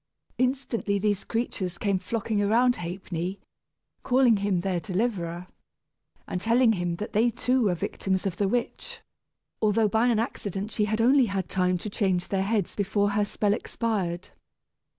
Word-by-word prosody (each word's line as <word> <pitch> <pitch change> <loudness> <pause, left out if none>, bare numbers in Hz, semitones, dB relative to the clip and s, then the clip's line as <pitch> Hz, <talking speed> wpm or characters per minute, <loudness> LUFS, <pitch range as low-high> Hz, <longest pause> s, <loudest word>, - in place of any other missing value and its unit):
Instantly 255 -5 0
these 205 -1 0
creatures 195 -6 -3
came 200 -1 0
flocking 215 +2 -1
around 240 +4 +3
Ha'penny, 175 +1 -4 0.6
calling 250 -3 +4
him 195 -3 0
their 185 -1 -1
deliverer, 180 -3 -2 0.8
and 180 - -3
telling 230 +1 +4
him 175 -3 -1
that 210 +5 -6
they 225 +4 +4
too 250 +3 +1
were 185 -3 +2
victims 190 +3 -2
of 185 -3 -2
the 200 - +1
witch, 350 - -3 0.6
although 215 0 +3
by 220 +4 +2
an 235 -3 +3
accident 205 -2 -3
she 210 0 +1
had 215 +2 0
only 255 +1 +5
had 195 -2 -2
time 180 -1 +1
to 175 - -7
change 185 -4 0
their 195 -1 +1
heads 200 -1 0
before 205 0 +1
her 205 0 +1
spell 205 0 0
expired. 195 -6 -2
205 Hz, 155 wpm, -27 LUFS, 185-230 Hz, 0.8 s, only